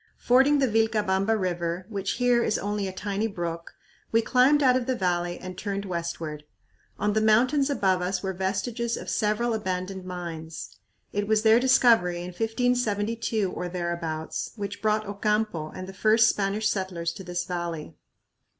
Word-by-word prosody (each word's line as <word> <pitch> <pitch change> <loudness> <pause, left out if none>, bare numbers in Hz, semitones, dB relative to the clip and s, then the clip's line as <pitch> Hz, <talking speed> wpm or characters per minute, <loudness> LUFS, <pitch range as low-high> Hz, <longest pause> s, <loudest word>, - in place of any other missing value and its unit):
Fording 270 +4 +4
the 270 -2 +3
Vilcabamba 220 -2 +1
River, 175 -1 -2
which 200 -3 -2
here 245 -1 +3
is 215 - +1
only 205 0 -2
a - - -4
tiny 200 +3 -2
brook, 170 -4 -5 0.4
we 225 - +4
climbed 260 +5 +4
out 255 -1 +5
of 255 -1 -1
the 260 - +1
valley 175 -3 -1
and 185 0 -8
turned 200 0 -3
westward. 170 -4 -4 0.5
On 210 0 0
the 215 - +2
mountains 255 +7 +3
above 190 -9 +1
us 180 +1 -2
were 190 -1 -2
vestiges 220 +6 -2
of - - -5
several 220 +2 +1
abandoned 190 -2 -3
mines. 170 -3 -7 0.4
It 205 0 -1
was 220 0 +2
their 220 +1 +6
discovery 235 -8 +4
in 175 - -6
1572 225 -1 0
or 180 - -4
thereabouts 170 -3 -3
which 200 -2 -5
brought 215 0 +1
Ocampo 205 -5 -1
and 185 - -7
the 190 - -8
first 220 +3 +4
Spanish 205 +1 0
settlers 185 -5 -2
to 195 - -9
this 175 -1 -3
valley. 170 -3 -4
200 Hz, 160 wpm, -26 LUFS, 180-225 Hz, 0.5 s, their